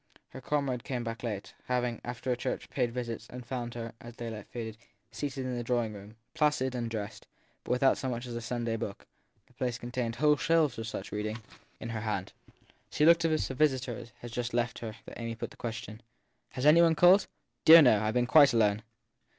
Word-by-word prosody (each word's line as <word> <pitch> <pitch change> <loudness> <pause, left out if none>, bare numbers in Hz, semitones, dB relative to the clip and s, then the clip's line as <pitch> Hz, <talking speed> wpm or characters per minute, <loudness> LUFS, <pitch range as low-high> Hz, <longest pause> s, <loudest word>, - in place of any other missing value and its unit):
Her 130 - -10
comrade 130 -3 -1
came 125 -3 -3
back 115 0 -5
late, 105 -4 -5
having, 125 -2 -1
after 125 +1 -2
church, 120 - -4
paid 125 -3 0
visits; 120 -2 -5
and 125 0 -9
found 120 -1 -4
her, 115 -1 -5
as 120 0 -10
daylight 115 -4 -6
faded, 110 -3 -6 0.4
seated 135 -2 -4
in 125 -1 -2
the 120 - -3
drawing 120 -2 0
room, 105 +2 -11 0.2
placid 145 -4 +1
and 120 -2 -3
dressed, 105 -3 -6 0.4
but - - -12
without 125 +2 +3
so 130 - -2
much 120 0 -4
as 120 -1 -6
a 120 - -3
Sunday 115 0 -2
book 105 -3 -6 0.4
the - - -27
place 125 -2 -2
contained 120 -1 -3
whole 150 +3 +4
shelves 155 -4 +2
of 115 - -4
such 100 -3 -6
read 105 0 -2
ing 110 +1 -4 0.4
in 115 - -6
her 110 -1 -3
hand. 105 -4 -3 0.6
She 150 - +2
looked 170 +1 +7
so 165 - +2
as 155 -1 +1
if - - -5
a - - -3
visitor 130 -4 0 0.2
had 120 - -8
just 120 0 -3
left 120 -1 0
her 110 -2 -6
that - - -10
Amy 115 -1 -4
put - - -6
the - - -14
question: 110 -1 -6 0.5
Has 130 - -3
any 155 +3 +7
one 165 -1 +5
called? 180 +5 +6 0.4
Dear, 165 0 +10
no; 115 -6 +5
I 110 - 0
ve 110 - -3
been 125 - +3
quite 140 +1 +7
alone. 105 -2 +3
120 Hz, 220 wpm, -30 LUFS, 115-130 Hz, 0.6 s, Dear